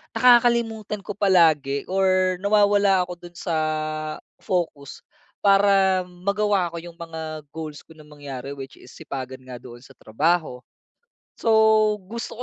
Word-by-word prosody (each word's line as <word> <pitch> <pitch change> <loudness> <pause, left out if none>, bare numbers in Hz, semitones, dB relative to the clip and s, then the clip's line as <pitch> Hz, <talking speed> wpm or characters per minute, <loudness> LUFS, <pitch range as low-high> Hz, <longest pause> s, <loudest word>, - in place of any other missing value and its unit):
Nakakalimutan 235 -3 +3
ko - - -6
palagi 160 -8 +3
or 185 -1 +2
nawawala 200 -2 +3
ako 180 - -7
dun 175 - -19
sa 170 -1 -4 0.9
focus 165 -6 -3 0.4
para 195 -1 +4
magawa 200 +1 0
ko - - -5
yung 170 0 -11
mga 160 -2 -7
goals 155 -2 -7
ko - - -20
na 155 - -15
mangyari 140 -2 -8
which 135 -1 -10
is 125 - -15
sipagan 130 -1 -7
nga 130 -1 -9
doon 120 -1 -12
sa 135 - -16
trabaho. 150 +2 -1 0.8
So, - - -1 0.6
gusto 230 +2 -7
175 Hz, 130 wpm, -23 LUFS, 145-200 Hz, 0.9 s, para